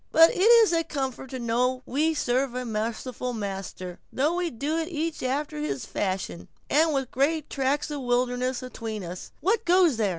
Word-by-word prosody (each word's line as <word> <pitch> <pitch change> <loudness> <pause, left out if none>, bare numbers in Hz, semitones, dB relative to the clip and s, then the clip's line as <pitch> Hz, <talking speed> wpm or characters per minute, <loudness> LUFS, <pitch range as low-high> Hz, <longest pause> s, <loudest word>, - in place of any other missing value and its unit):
But 325 +1 +7
it - - -5
is 450 -2 +7
a 330 0 +2
comfort 265 -4 -4
to 260 - -5
know 250 +2 0
we 310 +4 +1
serve 255 -1 0
a 250 0 -3
merciful 230 +3 -3
Master, 195 -4 -5
though 295 +5 +1
we 355 -1 0
do 290 +4 -2
it 325 - -2
each 330 -1 -3
after 260 - -2
his 140 -3 -3
fashion, 185 - -3 0.2
and 315 +2 +4
with 270 -3 -1
great 300 +3 0
tracts 280 +2 0
of 290 -2 -3
wilderness 250 +1 0
atween 225 -4 -5
us—what 315 - -2
goes 350 - +4
there?" 215 -3 +2
260 Hz, 175 wpm, -26 LUFS, 230-315 Hz, 0.2 s, But